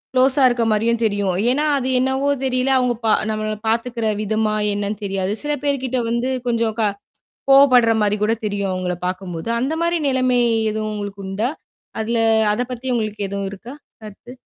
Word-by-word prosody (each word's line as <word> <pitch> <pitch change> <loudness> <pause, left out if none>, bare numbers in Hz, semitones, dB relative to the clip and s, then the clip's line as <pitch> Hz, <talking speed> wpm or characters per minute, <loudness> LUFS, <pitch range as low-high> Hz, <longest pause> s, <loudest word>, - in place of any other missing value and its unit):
க்ளோஸா 260 +2 +4
இருக்க 240 -1 0
மாரியும் 225 +2 +1
தெரியும். 205 -3 +1 0.2
ஏன்னா, 290 +4 0
அது 260 -2 -2
என்னவோ 265 +2 0 0.2
தெரியல 255 0 0
அவங்க 250 -1 +1
பா 220 - +3 0.2
நம்மள 215 0 -2
பார்த்துக்கிற 230 0 -1
விதமா 215 0 0 0.2
என்னன்னு 205 +1 -3
தெரியாது. 195 -1 -2
சில 295 0 -1
பேர் 280 -2 0
கிட்ட 255 0 -1
வந்து 235 +2 -1 0.2
கொஞ்சம் 230 -2 0
க - - +2 0.7
கோவப்படுற 255 -4 +6
மாதிரி 210 0 +2
கூட 220 +2 +2
தெரியும். 200 -2 -2
அவங்கள 180 -1 -2
பார்க்கும்போது. 180 0 -5
அந்த 265 +6 -1
மாரி 340 0 +1
நிலமை 255 -2 +2 0.3
எதுவும் 215 0 -3
உங்களுக்கு 205 -1 -6
உண்டா? 205 +5 -1 0.5
அதில 230 +1 -1 0.3
அத 225 - -1
பத்தி 250 +1 -6
உங்களுக்கு 215 -2 -3
எதுவும் 200 0 -3
இருக்கா 230 +6 -10 0.3
கருத்து? 215 +3 -11
225 Hz, 165 wpm, -20 LUFS, 205-255 Hz, 0.7 s, கோவப்படுற